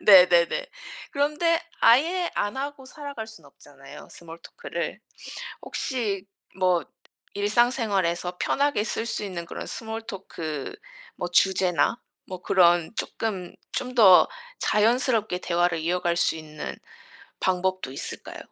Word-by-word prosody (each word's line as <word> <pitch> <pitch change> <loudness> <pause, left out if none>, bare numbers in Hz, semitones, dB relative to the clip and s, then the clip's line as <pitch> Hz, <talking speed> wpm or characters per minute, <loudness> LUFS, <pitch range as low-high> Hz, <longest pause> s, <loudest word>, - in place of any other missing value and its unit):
네네네. 180 -4 +6 0.5
그런데 300 +4 +2 0.2
아예 335 +10 +4
안 205 +5 -1
하고 280 0 -5
살아갈 280 -5 -7
순 220 0 -14
없잖아요, 140 0 -14
small 165 0 -11
talk - - -11
를. - - -3 0.6
혹시 215 -8 -2 0.3
뭐 180 -3 +2 0.5
일상 215 +4 +3
생활에서 185 -7 -1
편하게 280 -7 +1
쓸 225 0 -2
수 220 -2 -2
있는 175 -4 -5
그런 - - -6
small 225 0 -5
talk 160 - -6 0.4
뭐 175 - -3
주제나 185 +3 +3 0.3
뭐 185 -1 -8
그런 175 -3 +4
조금 195 -6 -3 0.2
좀 255 0 -3
더 195 -7 +8 0.3
자연스럽게 225 -2 +2
대화를 175 -1 +1
이어갈 175 +1 0
수 170 - +2
있는 155 -1 -7 0.6
방법도 185 -5 0
있을까요? 135 - -6
190 Hz, 285 characters per minute, -25 LUFS, 175-235 Hz, 0.6 s, 더